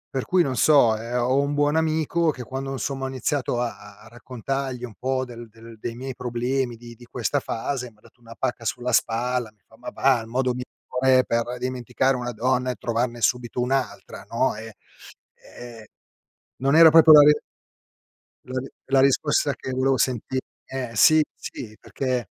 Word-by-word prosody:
per 130 - 0
cui 185 -1 +2
non 135 -4 -2
so. 130 -6 +5
Ehm, 115 +3 -4
ho 130 +3 +2
un 140 +1 -1
buon 145 +1 +1
amico 160 +1 +1
che 130 -4 -8
quando 135 +2 -5
insomma 135 0 -4
ho - - -2
iniziato 130 -1 -2
a 120 -1 -2
a 105 0 -15
a 110 - -15
raccontargli 125 +2 -5
un 115 - -11
po' 130 0 -1
del 120 -2 -10
del 115 +1 -14
dei 115 +2 -6
miei 130 +1 -6
problemi 125 0 -2
di 120 0 -12
di 120 - -16
questa 125 +4 -2
fase, 125 +1 -4
m'ha 105 - -28
dato 120 - -23
una 115 -1 -13
pacca 120 - -2
sulla 125 +2 -2
spalla, 120 +1 0
mi 105 - -39
fa: - - -20
"Ma - - -7
va, 130 -3 +2
il 110 - -10
modo 125 +2 0
migliore 130 +1 0
per 115 +1 -1
dimenticare 130 +1 -1
una 125 0 -4
donna 125 +2 0
è - - -6
trovarne 120 +1 -2
subito 120 +1 0
un'altra, 130 +1 -2
no?" - - 0
E, 110 -1 -9 0.8
ehm, 120 -2 -10 0.8
non 135 +3 +2
era 165 0 +9
proprio 160 0 +7
la 150 -1 +10
re 150 +1 +5 1.1
la 130 0 -3
ri 130 - -7 0.2
la 135 0 +3
risposta 140 +1 +2
che 130 - -8
volevo 130 +1 +1
senti 130 +1 -1 0.3
eh, 130 -3 -4
sì, 155 +8 +6 0.2
sì, 110 -3 -8
perché 130 -3 -3
125 Hz, 185 wpm, -24 LUFS, 120-135 Hz, 1.1 s, la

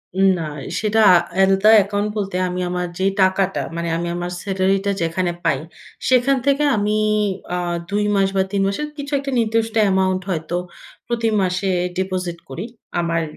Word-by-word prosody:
উ 190 - 0 0.2
না, 165 - -2 0.4
সেটা 215 +1 +2 0.4
আলাদা 195 +2 +4
অ্যাকাউন্ট 205 +1 +1
বলতে 195 -3 -3
আমি 180 0 -3
আমার 180 0 -2
যে, - - 0 0.2
টাকাটা, 190 0 +2
মানে 170 0 -2
আমি 170 - -3
আমার 175 0 -4
স্যালারিটা 195 0 +1
যেখানে 175 +2 0
পাই, 135 - +1 0.5
সেখান 260 +2 +4
থেকে 280 +1 +2
আমি 210 0 0 0.6
আ - - -1 0.3
২ 205 +1 0
মাস 195 -1 +3
বা, 190 - +3
৩ 200 - 0
মাসের 250 +10 -2
কিছু 285 0 -6
একটা 275 0 -4
নির্দিষ্ট 225 0 0
অ্যামাউন্ট 190 -2 +2
হয়তো 170 0 -2 0.5
প্রতি 230 -1 0
মাসে 185 +1 0 0.3
ডিপোজিট 185 -2 -2
করি 170 +10 -5 0.3
আমার 165 -1 0
195 Hz, 155 wpm, -20 LUFS, 180-210 Hz, 0.6 s, আলাদা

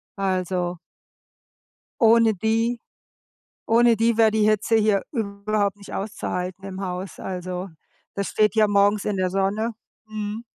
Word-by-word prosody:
Also 185 -2 -1 1.2
ohne 225 -1 +5
die 225 +4 0 0.9
ohne 235 +1 +5
die 230 +1 +2
wäre 225 -1 +6
die 215 -1 +2
Hitze 215 +1 +2
hier 215 -3 +3
überhaupt 205 -3 -1
nicht 200 - -12
auszuhalten 185 -2 -4
im 190 0 -6
Haus. 185 0 -5
Also, 185 0 -5 0.4
das 200 -1 -3
steht 210 -2 +2
ja 215 -1 +4
morgens 205 0 +2
in 205 -2 -1
der 185 -1 0
Sonne, 200 +4 0 0.3
mhm. 215 +1 -5
205 Hz, 130 wpm, -23 LUFS, 190-220 Hz, 1.2 s, wäre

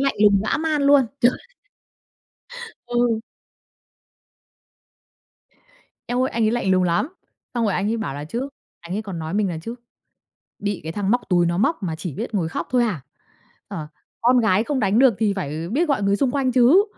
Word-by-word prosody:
lạnh 275 0 +1
lùng 200 -2 +5
dã - - +1
man 310 -2 0
luôn! 280 -3 +5
Trời. 245 +1 +3 1.5
Ừ. 240 -2 +1 2.9
Eo 245 +1 0
ơi. 260 - 0
Anh 230 -1 0
ấy 215 - +3
lạnh 230 -5 0
lùng 185 -1 +4
lắm, 175 - +1 0.5
xong 235 - +1
rồi 205 - +1
anh 200 +4 0
ấy 230 - 0
bảo 215 -11 -4
là 145 +1 -5
chứ, 240 - -4 0.3
anh 175 +2 -6
ấy 220 - -2
còn 190 -5 -6
nói 160 +3 -4
mình 205 -2 +1
là 165 - -4
chứ: 230 +5 -5 0.9
"Bị 205 -1 -2
cái 160 - -4
thằng 200 +2 -1
móc 245 +1 +2
túi 175 -1 +3
nó 170 +1 0
móc 220 +4 +1
mà 165 -4 -2
chỉ 165 -3 -6
biết - - -5
ngồi 165 -4 0
khóc - - -4
thôi 250 -1 +3
hả? 195 - -2 0.7
Ờ, 150 -1 -6 0.3
con 245 +1 +4
gái 215 -1 +2
không 275 0 -1
đánh 205 +2 +2
được 260 -4 +6
thì 215 -3 +2
phải, 155 -3 -3
ờ, 170 - -6
biết 310 +7 +1
gọi 265 -8 +1
người 200 0 +2
xung 260 +1 +1
quanh 265 -2 0
chứ." 265 +11 +6
215 Hz, 200 wpm, -22 LUFS, 185-250 Hz, 2.9 s, được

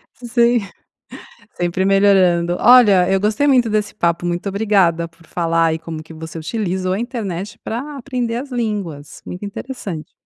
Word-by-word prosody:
Sim, 240 0 +2 1.0
sempre 175 +2 0
melhorando. 185 -3 +3
Olha, 210 -7 +6
eu 195 - +3
gostei 215 +8 +1
muito 250 -4 +4
desse 210 -1 -1
papo. 170 -3 0
Muito 175 +3 -2
obrigada 190 -5 +2
por 165 0 -23
falar 165 -1 +1
aí 160 0 -1
como 160 -1 -7
que 160 - -13
você 160 +1 -8
utilizou 185 0 -2
a 200 - -2
internet 210 -4 -5
pra 275 +6 -5
aprender 245 -3 -3
as 270 +3 -5
línguas, 200 - -4
muito 180 +3 -7
interessante. 200 -7 -7
195 Hz, 150 wpm, -19 LUFS, 170-230 Hz, 1.0 s, Olha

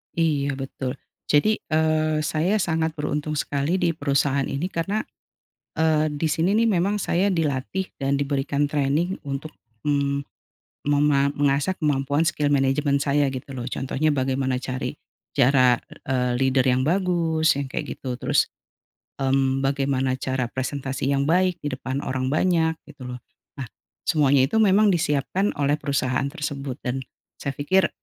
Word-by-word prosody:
Iya 145 -4 +1
betul. 135 -1 -4 0.3
Jadi, 215 +9 +3
eee, 155 -1 +1
saya 160 +6 +1
sangat 160 -2 0
beruntung 150 0 -2
sekali 145 +3 0
di 175 -2 +2
perusahaan 140 -2 +1
ini 175 +7 -3
karena, 195 +6 -1 0.7
eee, 155 -1 +2
di 150 +2 -1
sini 175 +6 +2
nih 230 +1 +3
memang 195 +1 +1
saya 180 +3 +1
dilatih 165 +1 -1
dan 135 0 +1
diberikan 140 0 0
training 150 +6 0
untuk, 140 +3 -4 0.3
mmm, 140 -1 0 0.6
mema 145 -1 +3
mengasah 145 +4 +2
kemampuan 145 0 +1
skill 150 -3 +1
management 140 +1 +2
saya 145 0 +2
gitu 130 +1 -7
loh. 125 -2 -5
Contohnya 135 +4 -1
bagaimana 130 -1 0
cari 130 0 -3 0.4
cara, 125 -1 +4 0.3
eee, 125 -2 0
leader 130 0 +2
yang 125 0 +3
bagus 165 -3 +2
yang 140 - -2
kayak 130 - -5
gitu 130 -2 -4
terus, - - +2 0.7
mmm, 135 0 +1
bagaimana 135 -1 0
cara 130 -2 -2
presentasi 135 +1 -2
yang 140 - +1
baik 180 +3 +1
di 145 - -2
depan 130 +1 -4
orang 130 0 -2
banyak 160 +2 +2
gitu 130 - -11
loh. 125 0 -6 0.4
Nah 135 -3 -6 0.4
semuanya 140 -5 +3
itu 220 - +1
memang 210 0 +5
disiapkan 170 +4 0
oleh 145 +1 +1
perusahaan 135 -2 0
tersebut 140 -2 -4
dan 125 +1 -2 0.4
saya 140 -1 -4
pikir, 185 +5 +2
145 Hz, 145 wpm, -24 LUFS, 135-160 Hz, 0.7 s, memang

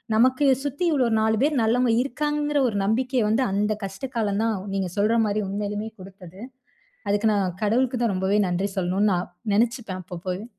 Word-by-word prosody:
நமக்கு 255 +5 +3 0.2
சுத்தி 285 +4 -3
இவ்ளோ 270 -5 +2
4 220 0 +2
பேர் 295 +3 +2
நல்லவங்க 240 +2 +2
இருக்காங்கங்கிற 295 +2 -1
ஒரு 210 - -5
நம்பிக்கை 250 +4 +1
வந்து 225 +5 +2
அந்த 210 +2 +1
கஷ்ட 195 +7 -5
காலம் 210 -2 0
தான், 225 -3 0 0.2
நீங்க 190 -2 -1
சொல்ற 220 +3 +2
மாரி 210 0 0
உண்மையிலுமே 205 +2 -3
குடுத்தது. 185 0 -12 0.7
அதுக்கு 205 +2 +2
நான் 185 -3 0
கடவுளுக்கு 245 +3 +1
தான் 225 -4 +1
ரொம்பவே 190 +2 +1
நன்றி 190 +3 -1
சொல்லணும் 190 +3 +1
நான் 180 0 -2 0.2
நெனைச்சுப்பேன் 225 -3 0
அப்பப்போவே. 180 +3 -5
210 Hz, 165 wpm, -24 LUFS, 195-250 Hz, 0.7 s, நமக்கு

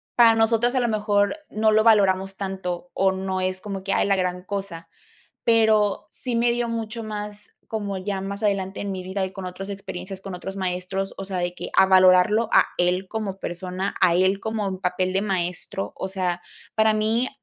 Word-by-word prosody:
para 230 -2 +7
nosotras, 230 +2 +2
a 255 - +3
lo 240 - +1
mejor, 210 +4 +1
no 215 0 +2
lo 215 0 +4
valoramos 195 -3 +4
tanto 185 -3 -4
o 190 0 +3
no 190 0 -2
es 185 0 -2
como 195 -2 -5
que, 195 0 -1
ay, - - +2
la 200 - +3
gran 180 -1 -1
cosa, 195 -5 -5 0.6
pero 215 -3 +3
sí 245 -3 -3
me 235 +1 +3
dio 240 0 -1
mucho 230 0 -4
más 210 -1 -7 0.2
como 205 -3 -3
ya 195 +1 -3
más 200 +2 -5
adelante 195 -2 0
en 200 -1 -3
mi 185 - -4
vida 190 +1 -2
y 190 - -9
con 190 -2 -6
otras 190 +2 -6
experiencias, 195 -1 -7
con 195 -1 -7
otros 195 +2 -7
maestros, 185 +1 -2
o 195 - -4
sea, 190 -1 -4
de 175 0 -2
que - - -6
a 190 - +7
valorarlo 190 +4 +5
a - - +6
él 180 +2 +1
como 205 -3 -4
persona, 185 +2 -4
a 170 - +5
él 190 +2 +3
como 220 -2 -2
en 190 -1 -4
papel 185 0 0
de 195 +1 +1
maestro. 185 -1 -3
O - - -3
sea, 180 -2 -2 0.4
para 220 0 +4
mí 220 +4 +1
195 Hz, 205 wpm, -24 LUFS, 185-215 Hz, 0.6 s, para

